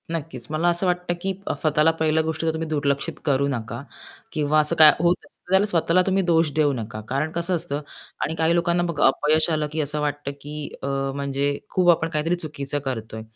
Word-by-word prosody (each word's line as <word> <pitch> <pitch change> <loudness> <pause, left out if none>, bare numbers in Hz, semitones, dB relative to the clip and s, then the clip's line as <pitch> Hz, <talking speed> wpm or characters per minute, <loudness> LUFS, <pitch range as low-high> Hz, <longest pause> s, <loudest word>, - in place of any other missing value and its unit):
नक्कीच, 150 -7 -5
मला 160 +3 +2
असं 175 +2 0
वाटतं 180 0 0
की 195 +1 -1 0.3
स्वतःला 155 0 +3
पहिलं 160 0 +2
गोष्ट 160 -1 -2
जर 160 - +2
तुम्ही 160 0 -3
दुर्लक्षित 145 -2 -1
करू 140 -1 +2
नका 115 -2 -4 0.5
किंवा 150 0 +2
असं 150 0 +1
काय 155 -1 +9
होत 175 +2 +3
असतं - - -26
तर - - -11
त्याला 190 +2 +5
स्वतःला 180 -2 +2
तुम्ही 195 0 +2
दोष 165 -3 +2
देऊ 150 -2 +3
नका. 110 -3 -5
कारण 140 +5 -1
कसं 170 +2 -1
असतं 145 -3 -2 0.4
आणि 160 - -2
काही 165 +1 +2
लोकांना 170 0 +2
बघा 170 -4 +1
अपयश 155 +4 +2
आलं 155 -2 0
की 155 0 -1
असं 150 +1 -2
वाटतं, 145 -1 -2
की 150 0 -6
अ, - - -2 0.3
म्हणजे 140 0 -1
खूप 180 -2 +2
आपण 165 -1 0
काहीतरी 165 +2 0
चुकीचं 145 -4 -4
करतोय. 110 -4 -4
155 Hz, 200 wpm, -23 LUFS, 140-170 Hz, 0.5 s, काय